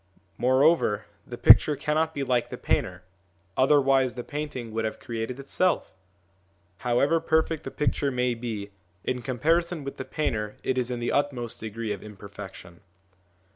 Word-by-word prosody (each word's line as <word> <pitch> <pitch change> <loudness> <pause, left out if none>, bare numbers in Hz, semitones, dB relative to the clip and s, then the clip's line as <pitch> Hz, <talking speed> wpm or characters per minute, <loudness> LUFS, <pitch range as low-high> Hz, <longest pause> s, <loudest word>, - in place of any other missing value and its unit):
Moreover, 130 -2 +3 0.2
the - - -7
picture 150 - +7
cannot 155 +3 0
be 140 - -1
like 125 -2 0
the - - -6
painter, 90 +1 -1 0.5
otherwise 135 -2 +4
the 120 - -5
painting 145 -6 -5
would 110 +1 -2
have 110 - -3
created 115 +2 -4
itself. 175 +6 0 0.9
However 140 +7 +2
perfect 160 -1 0
the - - -3
picture 145 0 0
may 125 -1 0
be, 110 -4 -5 0.3
in 125 -1 -2
com 125 +1 -4
parison 165 +3 +1
with 140 - -6
the - - -4
painter 105 -8 -2
it 130 - 0
is 125 -1 -1
in 120 -1 -3
the 120 - -1
utmost 130 -5 -1
degree 110 0 -4
of 100 - -8
imperfection. 100 -4 -11
125 Hz, 155 wpm, -26 LUFS, 115-145 Hz, 0.9 s, picture